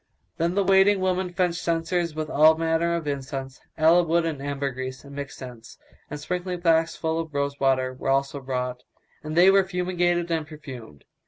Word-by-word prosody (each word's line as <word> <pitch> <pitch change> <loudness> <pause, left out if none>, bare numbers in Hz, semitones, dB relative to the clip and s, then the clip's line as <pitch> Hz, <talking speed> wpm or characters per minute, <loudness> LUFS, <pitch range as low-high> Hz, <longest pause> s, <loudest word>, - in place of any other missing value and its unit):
Then 170 +2 0
the 200 - +2
waiting 195 +1 +4
women 185 -1 0
fetched 180 -1 0
censers 170 0 -1
with 155 0 -3
all 155 +2 +5
manner 165 +1 +1
of 170 -2 -4
incense, 135 -2 -5 0.2
aloe 165 +3 +5
wood 170 0 +1
and 155 -4 -3
ambergris 135 -2 -4
and 140 0 -12
mixed 140 0 -6
scents; 120 -3 -11 0.3
and 150 - -6
sprinkling 180 +3 -4
flasks 165 -1 +2
full 160 0 -2
of 160 -3 -6
rose 140 0 -1
water 130 -1 +1
were 130 - -4
also 135 +1 0
brought 125 -1 -3 0.4
and 155 0 -5
they 180 +3 +7
were 195 0 +5
fumigated 175 -2 -1
and 160 -2 -1
perfumed. 130 - -11
160 Hz, 180 wpm, -25 LUFS, 140-175 Hz, 0.4 s, they